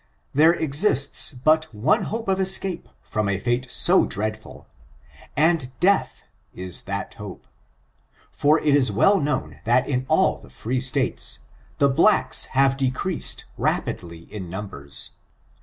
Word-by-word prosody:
There 160 +4 +5
exists 145 -2 +2
but 155 +4 +1
one 130 +10 +1
hope 225 0 -5
of 190 0 +1
escape 190 -1 0
from 105 -1 -2
a 100 - 0
fate 120 +5 -2
so - - +4
dreadful, 110 +1 -5 0.7
and 155 -3 +2
dea^h 195 +3 +1 0.3
is 90 -1 -3
that 100 -1 -4
hope; 105 -3 -10 0.9
for 150 +2 +2
it 150 -2 +1
is 135 -6 +4
well 195 - +3
known 150 -1 -3
that 120 +2 +2
in 130 -2 -2
all - - +2
the - - -17
free 125 +3 -3
states, 130 -1 0 0.4
the 140 - +4
blacks 135 - +3
have 135 0 +3
decreased 135 +6 -1
rapidly 85 -2 -3
in 95 -5 -7
numbers. 70 -8 -5
130 Hz, 135 wpm, -23 LUFS, 105-155 Hz, 0.9 s, There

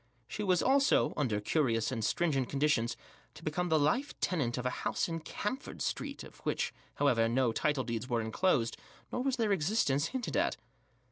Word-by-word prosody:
She 210 - -5
was 185 -3 +2
also, 275 +1 +4
under 120 -8 0
curious 115 -1 +1
and 115 -4 -2
stringent 135 -1 +1
conditions, 135 -5 +1 0.4
to 155 - -12
become 175 +3 -1
the 160 - +4
life 155 - +1
tenant 135 -10 0
of 125 - -3
a 125 - +1
house - - 0
in 165 -1 -3
Camford 210 - -5
Street - - -3
of - - -13
which, - - -1 0.2
however, 120 -6 +3
no 125 0 +2
title 145 +2 0
deeds 115 0 -4
were 120 -1 +1
enclosed, 115 +2 +1 0.3
nor 245 - -1
was 265 0 +1
their 225 -4 +1
existence 160 -5 +2
hinted 255 -2 -4
at. - - +1
150 Hz, 180 wpm, -32 LUFS, 120-185 Hz, 0.4 s, also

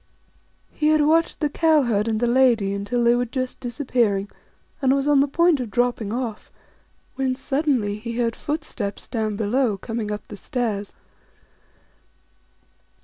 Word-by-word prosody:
He 300 - 0
had 310 0 +4
watched 325 +3 +2
the 300 - +1
Cow 315 -2 +3
herd 215 -3 0
and 220 -1 0
the 240 - +1
Lady 240 -4 +3
2 - - -2
until 220 +5 -1
they 235 0 +5
were 245 +1 +1
just 255 +1 -4
disappearing, 240 -6 -1 0.5
and 265 0 +3
was 275 +1 0
on 290 -1 +5
the 280 - +4
point 335 +1 +3
of 245 -3 -4
dropping 240 -1 0
off, 235 -2 -4 0.7
when 260 -1 0
suddenly 270 -7 0
he 230 +2 -5
heard 235 -2 0
foot 300 +2 -3
steps 205 -9 -5
down 220 -3 -2
below 220 +1 +1
coming 225 0 -4
up 210 0 -5
the 205 - -9
stairs. 210 -3 -3
245 Hz, 160 wpm, -23 LUFS, 215-275 Hz, 0.7 s, they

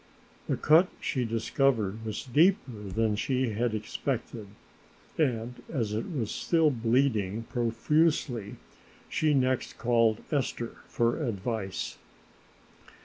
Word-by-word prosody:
The - - 0
cut 160 +5 +5
she 125 -3 -1
discovered 115 -2 0
was 110 -1 -4
deeper 160 - +3
than 110 +2 0
she 130 +3 0
had 110 +1 0
expected 110 0 -4 0.7
and, 125 -5 -1
as 115 -8 -1
it 110 +2 -2
was 120 -9 -2
still 165 -3 +2
bleeding 115 -4 +1
profusely, 125 -1 +1 0.5
she 155 -2 +2
next 130 -1 0
called 115 -2 +2
Esther 130 -5 -2
for 120 +6 0
advice. 105 -4 -3
120 Hz, 105 wpm, -29 LUFS, 110-135 Hz, 0.7 s, cut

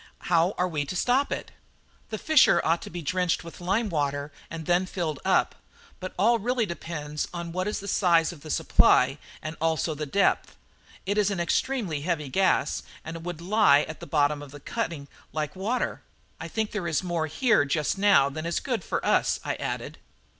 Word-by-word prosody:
How 170 +3 +3
are 180 - +1
we 155 -4 -2
to 185 - -5
stop 250 +9 +2
it?" - - -4 0.6
"The 215 - -3
fissure 315 +5 +5
ought 165 +1 +2
to - - -8
be 175 0 -6
drenched 180 +3 0
with 170 +1 -11
lime 200 +6 +1
water, 145 -4 -1 0.2
and 160 -1 -6
then 175 +3 +2
filled 165 -6 -3
up; - - +2 0.5
but 185 - -7
all 230 +5 +4
really 240 +2 0
depends 155 -4 -4
on 170 -1 -5
what 185 +3 -2
is 210 - -2
the 200 - -8
size 175 -4 +3
of 155 - -14
the 155 - -10
supply 135 -1 +4 0.2
and 155 +1 -5
also 160 0 +1
the 150 0 -5
depth. 200 +8 +1 0.5
It 200 +2 +1
is 205 -1 +3
an 195 -3 -2
extremely 175 - 0
heavy 150 -3 -2
gas, 185 -2 +2 0.2
and 165 +1 -6
would 175 -2 -5
lie 190 -6 +5
at 155 - -6
the - - -9
bottom 145 0 +2
of 145 0 -10
a - - -9
cutting 165 - -4 0.3
like 150 0 -3
water. 215 +7 -2 0.4
I - - -5
think 220 -1 -2
there 205 -5 -3
is 160 +1 0
more 170 -3 -1
here 215 - +3
just 150 +5 -1
now 200 -9 +5
than 155 +4 -5
is 170 - 0
good 245 -4 -2
for - - -2
us," - - +2
I - - 0
added. - - -4
170 Hz, 195 wpm, -26 LUFS, 155-200 Hz, 0.6 s, fissure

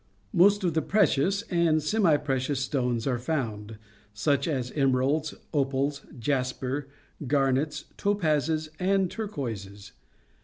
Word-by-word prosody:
Most 200 +3 +5
of 175 -3 +1
the 160 - +1
precious 195 +1 +2
and 170 -3 +3
semi 165 0 +3
precious 135 -1 -1
stones 125 -4 -1
are 125 -3 0
found, 110 -7 -3 0.4
such 140 +6 +1
as 130 -5 -2
emeralds, 140 +2 +1 0.2
opals, 140 0 0 0.2
jasper, 130 +2 -2 0.4
garnets, 135 +1 +1
topazes, 155 -5 +1
and 190 0 +2
turquoises. 110 - -5
145 Hz, 110 wpm, -27 LUFS, 130-160 Hz, 0.4 s, Most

